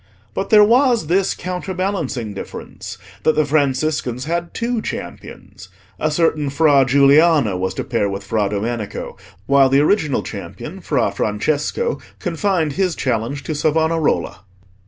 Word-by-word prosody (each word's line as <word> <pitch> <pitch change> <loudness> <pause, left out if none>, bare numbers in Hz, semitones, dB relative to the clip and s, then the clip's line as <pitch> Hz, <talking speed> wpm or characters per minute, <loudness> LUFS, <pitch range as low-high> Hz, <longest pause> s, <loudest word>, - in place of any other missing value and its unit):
But 195 - -3
there 210 -1 +7
was 240 - +3
this 185 +4 +1
counterbalancing 180 - -3
difference, 100 - -8 0.2
that 155 - +2
the 155 - +2
Franciscans 140 -3 0
had 170 +2 -2
two 235 0 -2
champions: - - -8 0.3
a 155 - +1
certain 155 -2 +1
Fra 140 -1 +4
Giuliano 140 - +4
was 95 +1 -2
to - - -3
pair 115 -5 -1
with 100 0 -5
Fra 105 0 0
Domenico, 105 +1 -4 0.3
while 140 -1 +4
the 135 +2 +4
original 150 -3 +1
champion, - - -8
Fra - - 0
Francesco, 150 - -1 0.2
confined 170 -3 -1
his 185 +2 0
challenge 125 +3 -2
to 155 - -3
Savonarola. 160 - 0
150 Hz, 135 wpm, -19 LUFS, 125-175 Hz, 0.3 s, there